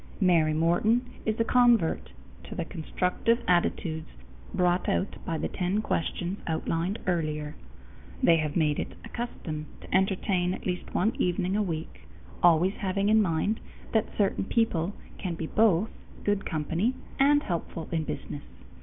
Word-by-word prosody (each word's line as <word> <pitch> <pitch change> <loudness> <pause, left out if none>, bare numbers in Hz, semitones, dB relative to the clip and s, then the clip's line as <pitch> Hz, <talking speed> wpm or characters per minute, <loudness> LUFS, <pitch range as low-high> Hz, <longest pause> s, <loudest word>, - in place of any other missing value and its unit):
Mary 170 -5 +4
Morton 175 +10 +2 0.2
is 220 0 0
a - - +5
convert 240 -7 +3 0.4
to - - -8
the - - -2
constructive 180 +7 0
attitudes 170 -2 +1 0.4
brought 180 0 +2
out 195 - -1
by 165 -3 -1
the - - -1
ten 185 +2 -1
questions 180 -1 -2
outlined 165 +4 -1
earlier. 155 -4 -1 0.7
They 165 - +6
have 155 -2 -1
made 150 -3 +2
it - - -4
a - - -9
custom 155 -10 -5
to - - -4
entertain 190 -1 +2
at - - -11
least 180 -1 -3
one 215 +5 +2
evening 180 +1 +1
a 210 - +2
week, 165 -5 -4 0.3
always 175 +2 +5
having 200 +1 0
in 220 0 +6
mind 195 +4 +1 0.3
that 220 - +3
certain 195 -2 +1
people 200 -5 +1 0.2
can 180 -3 -3
be 165 - -4
both 210 +1 +3 0.3
good 205 -1 0
company 165 - 0 0.2
and 290 +2 +5
helpful 170 -2 -4
in 165 -2 0
business. 145 -1 -5
180 Hz, 150 wpm, -28 LUFS, 165-210 Hz, 0.7 s, They